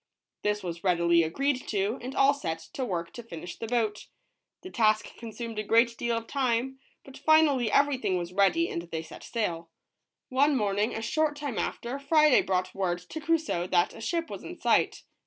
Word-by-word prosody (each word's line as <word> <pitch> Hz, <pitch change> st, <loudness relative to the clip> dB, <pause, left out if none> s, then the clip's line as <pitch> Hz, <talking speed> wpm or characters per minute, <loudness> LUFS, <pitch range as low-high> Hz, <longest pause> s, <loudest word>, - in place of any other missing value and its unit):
This 210 Hz, -1 st, -1 dB
was 170 Hz, -1 st, -5 dB
readily 170 Hz, -2 st, +3 dB
agreed 255 Hz, -, -1 dB
to, 205 Hz, +3 st, -1 dB
and 255 Hz, +3 st, -6 dB
all 275 Hz, +1 st, +5 dB
set 165 Hz, -, -3 dB, 0.2 s
to 265 Hz, -, -3 dB
work 170 Hz, -7 st, -3 dB
to 240 Hz, -, -7 dB
finish 175 Hz, -6 st, -8 dB
the 225 Hz, -, -4 dB
boat. 220 Hz, -3 st, -1 dB, 0.6 s
The 370 Hz, -, -8 dB
task 215 Hz, -2 st, +1 dB
consumed 230 Hz, -1 st, -6 dB
a -, -, -1 dB
great 230 Hz, +3 st, +3 dB
deal 235 Hz, 0 st, -1 dB
of 230 Hz, -, -5 dB
time, 260 Hz, 0 st, -1 dB, 0.3 s
but 270 Hz, -, -12 dB
finally 295 Hz, -7 st, +4 dB
everything 270 Hz, -9 st, +2 dB
was 175 Hz, 0 st, -5 dB
ready 200 Hz, -, +3 dB
and 170 Hz, -, -3 dB
they 165 Hz, -1 st, -5 dB
set -, -, -12 dB
sail. 170 Hz, -8 st, -3 dB, 0.6 s
One 280 Hz, +3 st, +3 dB
morning, 205 Hz, 0 st, 0 dB
a 225 Hz, -, -4 dB
short 305 Hz, +5 st, 0 dB
time 290 Hz, -5 st, -4 dB
after, 245 Hz, +4 st, -3 dB
Friday 300 Hz, 0 st, +5 dB
brought 185 Hz, -1 st, -1 dB
word 185 Hz, -3 st, -1 dB
to 315 Hz, -, -5 dB
Crusoe 315 Hz, -, 0 dB
that 175 Hz, -1 st, +2 dB
a 225 Hz, -, -11 dB
ship 335 Hz, +7 st, -1 dB
was -, -, -7 dB
in -, -, -9 dB
sight. -, -, +2 dB
230 Hz, 190 wpm, -28 LUFS, 185-275 Hz, 0.6 s, all